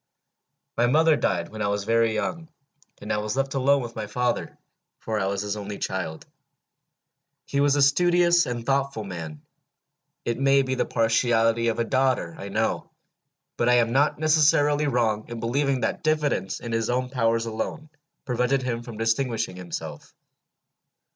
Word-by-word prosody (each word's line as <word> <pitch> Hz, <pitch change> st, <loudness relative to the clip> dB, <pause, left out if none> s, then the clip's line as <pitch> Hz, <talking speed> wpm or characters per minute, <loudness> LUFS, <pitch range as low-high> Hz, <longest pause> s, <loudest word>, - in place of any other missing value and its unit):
"My 120 Hz, +1 st, +3 dB
mother 160 Hz, +4 st, +4 dB
died 85 Hz, -10 st, -1 dB
when 110 Hz, 0 st, -8 dB
I 105 Hz, -, +1 dB
was 100 Hz, 0 st, -1 dB
very 115 Hz, +1 st, +2 dB
young, 165 Hz, +7 st, -3 dB, 0.5 s
and 105 Hz, -, -3 dB
I -, -, 0 dB
was 105 Hz, +4 st, -3 dB
left 135 Hz, 0 st, -1 dB
alone 135 Hz, 0 st, +2 dB
with 120 Hz, -1 st, -8 dB
my 110 Hz, -1 st, -4 dB
father, 125 Hz, +3 st, -2 dB, 0.4 s
for 110 Hz, -1 st, -3 dB
I 95 Hz, -, 0 dB
was 100 Hz, 0 st, -2 dB
his 105 Hz, 0 st, -3 dB
only 105 Hz, -1 st, -6 dB
child. 90 Hz, -4 st, -4 dB, 1.2 s
He 140 Hz, -, -2 dB
was 145 Hz, 0 st, +3 dB
a 145 Hz, -, +4 dB
studious 175 Hz, +4 st, +4 dB
and 120 Hz, -1 st, -4 dB
thoughtful 135 Hz, -4 st, 0 dB
man. 80 Hz, -6 st, -7 dB, 0.8 s
It 120 Hz, +1 st, -2 dB
may 135 Hz, 0 st, +4 dB
be 130 Hz, 0 st, -2 dB
the 130 Hz, -, -1 dB
partiality 115 Hz, 0 st, +2 dB
of 115 Hz, -, 0 dB
a 115 Hz, -, +1 dB
daughter, 130 Hz, -8 st, 0 dB
I 100 Hz, -, -6 dB
know, 110 Hz, +3 st, -1 dB, 0.7 s
but 120 Hz, -, +2 dB
I 125 Hz, -, +5 dB
am 115 Hz, -1 st, +3 dB
not 140 Hz, +4 st, +2 dB
necessarily 150 Hz, -1 st, +3 dB
wrong 115 Hz, -5 st, 0 dB
in 120 Hz, -1 st, -6 dB
believing 130 Hz, +3 st, 0 dB
that -, -, -1 dB
diffidence 150 Hz, -11 st, 0 dB
in 120 Hz, -, -6 dB
his 115 Hz, -1 st, -1 dB
own 125 Hz, +1 st, -1 dB
powers 115 Hz, -3 st, +1 dB
alone 115 Hz, +7 st, -4 dB, 0.4 s
prevented 125 Hz, +1 st, 0 dB
him 120 Hz, -2 st, -2 dB
from 120 Hz, -2 st, -9 dB
distinguishing 115 Hz, -3 st, -1 dB
himself. 90 Hz, -2 st, -7 dB
120 Hz, 165 wpm, -25 LUFS, 110-140 Hz, 1.2 s, I